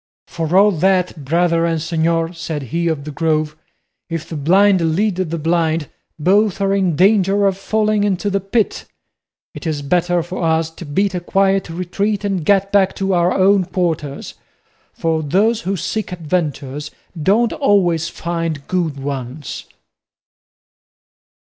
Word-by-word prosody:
"For 165 Hz, +1 st, -1 dB
all 205 Hz, +2 st, +6 dB
that, 180 Hz, -2 st, +1 dB
brother 165 Hz, +3 st, +1 dB
and 165 Hz, -1 st, 0 dB
señor," 165 Hz, +1 st, 0 dB
said 160 Hz, -3 st, -4 dB
he 170 Hz, 0 st, 0 dB
of 155 Hz, -4 st, -1 dB
the 150 Hz, -, -6 dB
Grove, 155 Hz, 0 st, 0 dB, 0.5 s
"if 165 Hz, -2 st, -4 dB
the 165 Hz, -, -6 dB
blind 175 Hz, +1 st, +3 dB
lead 205 Hz, 0 st, 0 dB
the 170 Hz, -3 st, -2 dB
blind, 160 Hz, -1 st, 0 dB, 0.3 s
both 195 Hz, +5 st, +2 dB
are 195 Hz, 0 st, +1 dB
in 190 Hz, -5 st, +1 dB
danger 195 Hz, +2 st, +3 dB
of 195 Hz, -1 st, +2 dB
falling 215 Hz, +1 st, 0 dB
into 200 Hz, 0 st, 0 dB
the 195 Hz, -, +1 dB
pit. 195 Hz, +3 st, -1 dB, 0.7 s
It -, -, -7 dB
is 150 Hz, -2 st, -2 dB
better 175 Hz, +3 st, +1 dB
for 180 Hz, +2 st, -6 dB
us 160 Hz, -1 st, +1 dB
to 165 Hz, +1 st, -10 dB
beat 195 Hz, +7 st, 0 dB
a 180 Hz, -, -1 dB
quiet 195 Hz, +1 st, +1 dB
retreat 195 Hz, +5 st, -2 dB
and 195 Hz, -4 st, -1 dB
get 195 Hz, +3 st, +2 dB
back 195 Hz, -2 st, +3 dB
to 195 Hz, 0 st, -1 dB
our 175 Hz, 0 st, +2 dB
own 195 Hz, +1 st, +4 dB
quarters; 160 Hz, -6 st, -3 dB, 0.6 s
for 160 Hz, -1 st, -1 dB
those 210 Hz, +10 st, +1 dB
who 195 Hz, -2 st, -2 dB
seek 215 Hz, +6 st, -3 dB
adventures 150 Hz, -4 st, -3 dB, 0.3 s
don't 220 Hz, +8 st, +2 dB
always 175 Hz, -, +2 dB
find 165 Hz, -4 st, -4 dB
good 165 Hz, -6 st, -1 dB
ones." 135 Hz, 0 st, -5 dB
175 Hz, 150 wpm, -18 LUFS, 160-195 Hz, 0.7 s, all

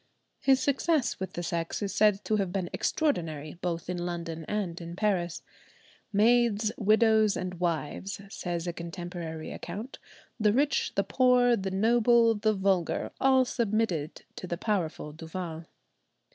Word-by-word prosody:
His 265 Hz, -1 st, +4 dB
success 285 Hz, +1 st, +1 dB
with 190 Hz, -, -5 dB
the 175 Hz, -, -4 dB
sex 165 Hz, -1 st, -2 dB
is 200 Hz, -, -2 dB
said 210 Hz, -2 st, +3 dB
to 215 Hz, -, +1 dB
have 195 Hz, -3 st, -1 dB
been 185 Hz, -2 st, -3 dB
extraordinary, 165 Hz, -, -1 dB
both 170 Hz, -2 st, -3 dB
in 175 Hz, -1 st, -3 dB
London 165 Hz, -2 st, -4 dB
and 185 Hz, -5 st, -3 dB
in 170 Hz, 0 st, -7 dB
Paris. 180 Hz, -4 st, -1 dB, 0.7 s
"Maids, 220 Hz, 0 st, +3 dB
widows, 220 Hz, 0 st, +4 dB
and 180 Hz, -1 st, -5 dB
wives," 175 Hz, +3 st, -2 dB
says 175 Hz, -3 st, -4 dB
a 175 Hz, -, -2 dB
contemporary 170 Hz, -2 st, -6 dB
account, 210 Hz, +9 st, -7 dB, 0.4 s
"the 210 Hz, -1 st, +3 dB
rich, 285 Hz, +4 st, +1 dB
the -, -, +2 dB
poor, 250 Hz, -2 st, +4 dB
the 195 Hz, -3 st, -3 dB
noble, 230 Hz, +3 st, +4 dB
the 215 Hz, 0 st, +1 dB
vulgar, 190 Hz, -3 st, 0 dB
all 265 Hz, -1 st, +5 dB
submitted 215 Hz, -, -1 dB
to 185 Hz, -, -6 dB
the 170 Hz, -, -3 dB
powerful 175 Hz, -7 st, -2 dB
Duval." 165 Hz, 0 st, -6 dB
195 Hz, 145 wpm, -28 LUFS, 170-225 Hz, 0.7 s, all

